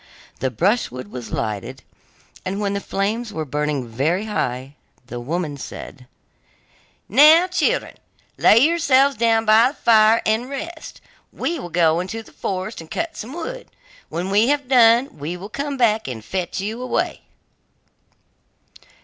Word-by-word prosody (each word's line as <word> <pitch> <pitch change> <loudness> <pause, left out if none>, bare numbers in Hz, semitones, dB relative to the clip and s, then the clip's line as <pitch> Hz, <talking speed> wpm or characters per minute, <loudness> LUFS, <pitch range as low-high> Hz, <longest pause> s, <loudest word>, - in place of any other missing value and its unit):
The 130 - 0
brushwood 130 - -1
was 125 -2 -7
lighted, 115 +4 -4 0.6
and 190 +2 -3
when 200 -1 -1
the 200 - -1
flames 215 +5 -2
were 160 -5 -4
burning 150 -2 -2
very 155 - -1
high, 130 - -3 0.3
the 120 0 -7
woman 150 +3 -3
said: 130 -1 -9 1.0
'Now, 305 - +7
children, 365 0 -1 0.4
lay 215 - +5
yourselves 280 -1 +4
down 225 0 +2
by 220 +2 +6
the 285 - -11
fire 220 -1 +4
and 225 +4 0
rest, 320 +4 -7 0.3
we 335 -1 -3
will 175 - -7
go 165 -1 +2
into 220 +5 -5
the - - -18
forest 190 +1 -4
and 160 - -13
cut 335 0 -3
some 240 +5 -7
wood. - - -6 0.4
When 180 +3 -3
we 210 +4 +4
have 285 -1 0
done, 240 - +4
we 160 +5 -4
will 195 +3 -9
come 280 +4 -4
back 220 - +2
and 115 -4 -6
fetch 185 0 -3
you 215 +5 -4
away. 255 - -2
210 Hz, 150 wpm, -21 LUFS, 155-250 Hz, 1.0 s, Now